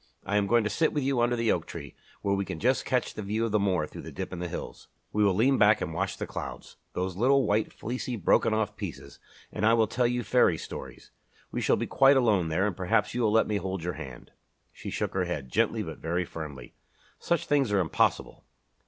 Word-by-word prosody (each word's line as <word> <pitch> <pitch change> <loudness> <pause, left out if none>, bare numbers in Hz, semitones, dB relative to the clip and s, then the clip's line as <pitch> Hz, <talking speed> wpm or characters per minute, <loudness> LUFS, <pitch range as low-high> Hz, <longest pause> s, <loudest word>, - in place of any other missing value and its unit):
"I 105 - +1
am 100 -1 +1
going 115 +2 +4
to 105 - -1
sit 165 - +1
with 145 - 0
you 135 -2 +1
under 120 +1 +2
the 115 -1 +1
oak 85 - -1
tree, 70 -5 -8 0.3
where 100 - +1
we 100 0 0
can 80 -4 -6
just 130 +3 +1
catch 125 -1 0
the - - -6
view 105 +3 -1
of 115 - -2
the 105 - +3
moor 95 -6 +1
through - - -10
the - - -9
dip - - -6
in 90 - -5
the 90 - -3
hills. - - -7 0.3
We 105 - +2
will 100 -3 +3
lean 130 +6 +3
back 105 +1 +5
and 80 - -4
watch 95 +4 -2
the - - -3
clouds - - -7 0.2
those 90 0 -2
little 135 +4 +4
white, 105 +1 +1
fleecy, 125 +1 -4
broken 105 +2 +3
off 110 -1 0
pieces - - -8 0.3
and - - -4
I 115 +2 +5
will 115 -1 +4
tell 120 +3 +1
you 125 0 -1
fairy 120 -11 +3
stories. - - -9 0.4
We - - -2
shall - - +3
be - - -2
quite 135 +1 +5
alone 105 -9 +3
there 85 +5 +1
and 105 -4 -1
perhaps 105 +3 +1
you 125 - -1
will 110 -2 +3
let 110 +1 +4
me 105 - -1
hold 95 -3 -4
your 90 +1 -2
hand." 65 -6 -9 0.4
She - - -7
shook - - -2
her 95 -1 0
head, 75 -7 -4
gently - - +1
but - - -8
very 85 +2 -1
firmly. 75 -7 -8 0.5
"Such 170 -2 0
things 140 -6 +2
are 100 - +3
impossible." 85 -4 0
105 Hz, 240 wpm, -28 LUFS, 90-120 Hz, 0.5 s, back